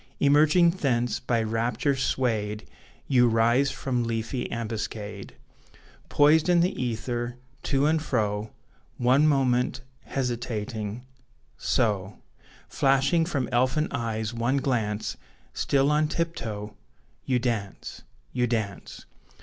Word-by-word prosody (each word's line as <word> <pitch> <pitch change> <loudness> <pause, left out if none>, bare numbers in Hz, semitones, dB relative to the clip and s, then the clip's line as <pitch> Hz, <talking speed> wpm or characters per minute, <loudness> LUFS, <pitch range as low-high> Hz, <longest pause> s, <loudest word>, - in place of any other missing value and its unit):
Emerging 155 +4 +5
thence 125 - 0
by 120 -3 0
rapture 115 +5 0
swayed 110 - -1 0.4
You 125 -3 +4
rise 120 +4 +3
from 125 -3 -2
leafy 115 +2 -3
ambuscade 110 -3 -5 0.7
Poised 155 +3 +4
in 175 -1 +5
the 180 +3 +1
ether, 120 +1 -3 0.2
to 135 0 +1
and 160 +1 +2
fro, 110 -7 -1 0.5
One 130 +5 +4
moment, 130 -2 +1 0.2
hesitating 120 -3 -3 0.5
so 105 -4 0 0.5
Flashing 135 +5 +2
from 140 -8 -1
elfin 130 +5 +1
eyes 110 -1 -2
one 120 +4 0
glance 110 -6 -1 0.4
Still 140 +1 +2
on 150 +1 +2
tiptoe 110 -12 -4 0.5
You 130 - +2
dance! 115 -5 -3 0.3
You 125 -1 +1
dance! 110 -5 -4
120 Hz, 105 wpm, -26 LUFS, 110-140 Hz, 0.7 s, Emerging